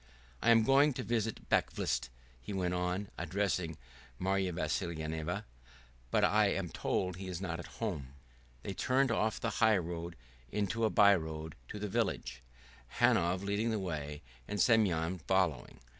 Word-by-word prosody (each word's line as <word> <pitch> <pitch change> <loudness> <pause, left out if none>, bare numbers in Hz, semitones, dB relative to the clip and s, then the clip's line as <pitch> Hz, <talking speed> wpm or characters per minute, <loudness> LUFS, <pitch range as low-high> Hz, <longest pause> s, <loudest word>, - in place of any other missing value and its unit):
"I - - +3
am 115 -1 +7
going 140 +4 +5
to - - -4
visit 110 0 -2
Bakvist," 65 - 0 0.3
he 80 - -6
went 90 -2 0
on, 90 +2 -1
addressing 90 -2 -1 0.4
Marya 95 +1 0
Vassilyevna, 80 -1 -2 0.6
"but - - +2
I - - +4
am - - -1
told 90 -1 -1
he 95 0 -6
is 90 -2 -4
not 85 -3 -3
at - - -7
home." 75 - -4 0.5
They 100 - -4
turned 130 +4 +2
off 110 -1 0
the 115 - -1
highroad 85 -6 +1 0.4
into 105 +2 0
a - - +3
by 100 -2 +6
road 80 -2 -5
to 105 - -7
the 105 0 -3
village, 95 - -2 0.6
Hanov 90 +3 +3
leading 100 +3 0
the 110 - 0
way 75 -6 -4 0.2
and 105 0 -3
Semyon 95 -6 +3
following. 90 -3 0
95 Hz, 150 wpm, -33 LUFS, 85-105 Hz, 0.6 s, am